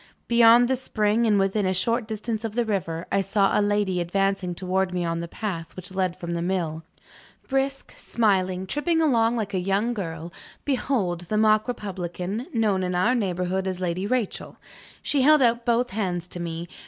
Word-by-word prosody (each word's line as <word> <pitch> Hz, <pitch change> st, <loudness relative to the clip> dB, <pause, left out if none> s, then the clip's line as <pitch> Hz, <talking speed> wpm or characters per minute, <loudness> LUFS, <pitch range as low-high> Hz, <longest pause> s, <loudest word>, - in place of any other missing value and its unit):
Beyond 235 Hz, +1 st, +6 dB
the 260 Hz, -, +2 dB
spring, 225 Hz, -2 st, +1 dB
and 210 Hz, -2 st, +4 dB
within 195 Hz, +1 st, +1 dB
a 185 Hz, -, 0 dB
short 230 Hz, +4 st, 0 dB
distance 220 Hz, +1 st, -3 dB
of 220 Hz, -1 st, -4 dB
the 240 Hz, -1 st, +1 dB
river, 175 Hz, -6 st, -2 dB
I 195 Hz, -, +2 dB
saw 195 Hz, 0 st, +2 dB
a -, -, +3 dB
lady 205 Hz, -3 st, +1 dB
advancing 195 Hz, 0 st, 0 dB
towards 190 Hz, +1 st, -1 dB
me 180 Hz, -1 st, -1 dB
on 165 Hz, 0 st, -1 dB
the 170 Hz, -, -4 dB
path 170 Hz, -3 st, -5 dB
which 185 Hz, 0 st, -9 dB
led 185 Hz, -2 st, -1 dB
from 170 Hz, 0 st, -5 dB
the 170 Hz, -, -2 dB
mill. 170 Hz, -3 st, -2 dB, 0.7 s
Brisk, 270 Hz, 0 st, -2 dB
smiling, 190 Hz, -4 st, 0 dB
tripping 310 Hz, -, 0 dB
along 240 Hz, -7 st, +3 dB
like 215 Hz, -4 st, -3 dB
a 185 Hz, -, +1 dB
young 195 Hz, +6 st, 0 dB
girl, 170 Hz, -5 st, -5 dB, 0.3 s
behold 245 Hz, -, 0 dB
the 215 Hz, -, 0 dB
mock 215 Hz, +1 st, +4 dB
republican, 195 Hz, -1 st, -4 dB
known 215 Hz, -5 st, +1 dB
in 180 Hz, -1 st, -1 dB
our 185 Hz, +8 st, +3 dB
neighborhood 190 Hz, -4 st, -1 dB
as 185 Hz, -1 st, -3 dB
Lady 185 Hz, +2 st, -2 dB
Rachel! 245 Hz, -3 st, -2 dB, 0.5 s
She 285 Hz, -, +2 dB
held 300 Hz, +1 st, +6 dB
out 235 Hz, 0 st, +1 dB
both 240 Hz, +1 st, +2 dB
hands 180 Hz, -4 st, -2 dB
to 175 Hz, -, -6 dB
me. 170 Hz, 0 st, -4 dB
195 Hz, 185 wpm, -25 LUFS, 180-230 Hz, 0.7 s, Beyond